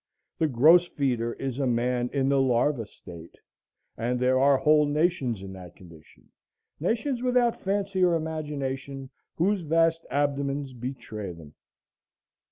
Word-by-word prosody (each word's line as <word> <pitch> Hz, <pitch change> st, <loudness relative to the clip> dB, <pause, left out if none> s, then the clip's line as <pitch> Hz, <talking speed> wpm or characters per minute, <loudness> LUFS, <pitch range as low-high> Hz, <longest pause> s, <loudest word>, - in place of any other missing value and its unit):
The 160 Hz, -, +3 dB
gross 155 Hz, +7 st, +5 dB
feeder 120 Hz, -6 st, -1 dB
is 135 Hz, -1 st, -5 dB
a 135 Hz, -, +1 dB
man 120 Hz, +1 st, 0 dB
in 135 Hz, -2 st, 0 dB
the 135 Hz, -1 st, +3 dB
larva 125 Hz, -2 st, +1 dB
state; 85 Hz, -4 st, -13 dB, 0.6 s
and 120 Hz, +2 st, -2 dB
there 130 Hz, +1 st, +2 dB
are 140 Hz, 0 st, +5 dB
whole 150 Hz, +1 st, +4 dB
nations 145 Hz, -, 0 dB
in 95 Hz, 0 st, -8 dB
that 90 Hz, -2 st, -11 dB
condition, 85 Hz, -4 st, -17 dB, 0.5 s
nations 235 Hz, -, -1 dB
without 250 Hz, -2 st, +1 dB
fancy 195 Hz, -1 st, -1 dB
or 175 Hz, -2 st, +4 dB
imagination, 140 Hz, -4 st, -4 dB, 0.2 s
whose 195 Hz, +3 st, +1 dB
vast 165 Hz, +1 st, +2 dB
abdomens 140 Hz, 0 st, -1 dB
betray 115 Hz, -6 st, -6 dB
them. 80 Hz, -3 st, -14 dB
140 Hz, 135 wpm, -26 LUFS, 120-165 Hz, 0.6 s, gross